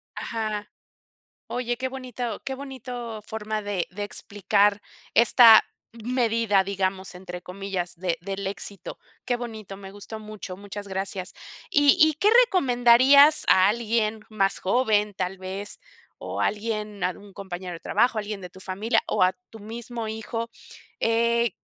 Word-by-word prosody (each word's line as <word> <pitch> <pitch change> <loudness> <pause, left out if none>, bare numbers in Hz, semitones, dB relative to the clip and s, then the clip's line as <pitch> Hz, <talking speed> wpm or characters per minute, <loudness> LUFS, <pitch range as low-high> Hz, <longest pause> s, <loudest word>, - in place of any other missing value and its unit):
Ajá. 215 -2 -4 0.8
Oye, 245 -1 -2
qué 260 +2 -2
bonito 250 -4 -5
qué 265 - -3
bonito 250 -4 -7
forma, 215 0 -4
de 200 -4 -2
de 205 +3 -5
explicar 205 0 +1 0.3
"esta 230 -1 +8 0.3
medida", 230 -4 +1
digamos, 190 -1 -2
entre 180 -1 -8
comillas, 185 -1 -4
de 175 -1 -1
del 195 +1 -4
éxito. 200 0 -6 0.3
Qué 245 - +1
bonito, 220 -5 -7
me 195 -1 -10
gustó 205 +2 -8
mucho, 215 -3 -8
muchas 200 +1 -8
gracias, 190 -1 -3 0.4
¿y 290 -1 +5
y 315 0 +6
qué 400 +8 +2 0.2
recomendarías 275 - +5
a 185 +1 +6
alguien 220 0 0
más 195 -2 +1
joven, 210 -1 +2
tal 185 0 -3
vez, 195 - -6 0.4
o - - -5
alguien, 210 -1 -2
algún 195 +3 -4
compañero 185 -2 -6
de 165 - -9
trabajo, 240 -2 +1
alguien 210 -1 -4
de 180 - -8
tu 190 - -14
familia 210 +5 0
o - - 0
a 185 0 +4 0.2
tu 225 - -11
mismo 230 +1 -6
hijo? 220 +1 -4 0.5
Eh, 235 0 +2
215 Hz, 140 wpm, -25 LUFS, 195-235 Hz, 0.8 s, esta